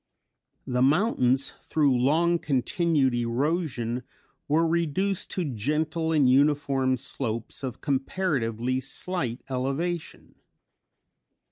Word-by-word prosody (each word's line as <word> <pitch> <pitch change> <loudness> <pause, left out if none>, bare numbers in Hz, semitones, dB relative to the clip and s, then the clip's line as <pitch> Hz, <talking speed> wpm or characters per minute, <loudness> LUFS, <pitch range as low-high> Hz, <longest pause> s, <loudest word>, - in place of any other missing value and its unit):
The 125 0 -1
mountains 135 - +2
through 145 -4 +2
long 165 +7 +2
continued 145 - +1
erosion 125 0 -1 0.5
were 160 +3 +3
reduced 170 +4 0
to 180 - -2
gentle 155 +6 -1
and 150 -5 +4
uniform 135 -1 +3
slopes 115 -3 -4
of 130 -2 -5
comparatively 130 - -1
slight 135 -2 -3
elevation. 140 +6 -3
140 Hz, 90 wpm, -26 LUFS, 125-165 Hz, 0.5 s, and